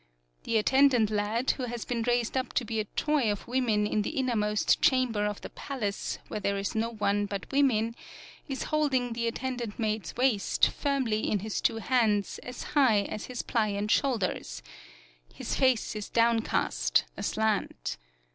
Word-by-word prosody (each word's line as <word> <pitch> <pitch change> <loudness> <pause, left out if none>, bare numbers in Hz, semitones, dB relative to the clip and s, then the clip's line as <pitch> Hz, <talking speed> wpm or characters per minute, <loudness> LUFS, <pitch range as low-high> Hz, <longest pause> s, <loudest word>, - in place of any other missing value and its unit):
The 230 - +1
attendant 250 -1 +4
lad, 215 +4 +1
who 255 - -4
has 240 -1 -5
been 240 -2 -2
raised 240 0 0
up 260 0 -1
to 245 - 0
be 225 0 -2
a 215 - -1
toy 280 -1 +1
of 205 - -5
women 235 -4 +1
in 210 0 0
the 205 - -4
innermost 215 -5 +1
chamber 250 -6 +2
of 210 -1 -4
the - - -7
palace 215 -8 -4
where - - -4
there 200 0 -1
is 200 0 -2
no 225 +1 0
one 205 -2 0
but 200 -1 -6
women, 230 -5 +2 0.5
is 270 -2 -3
holding 265 -6 +1
the 235 0 -1
attendant 240 -2 -3
maid's 215 -6 -2
waist 245 -5 +3
firmly 260 -7 -1
in 205 - 0
his 215 0 -3
two - - +2
hands 225 -4 +1
as 250 0 -7
high 255 -8 +5
as 215 - -5
his 250 -2 -5
pliant 210 -2 0
shoulders; 200 - 0 0.7
his - - -3
face 255 -4 +2
is 210 -1 -5
downcast, 225 - +2
aslant. 200 - -1
225 Hz, 165 wpm, -29 LUFS, 210-255 Hz, 0.7 s, high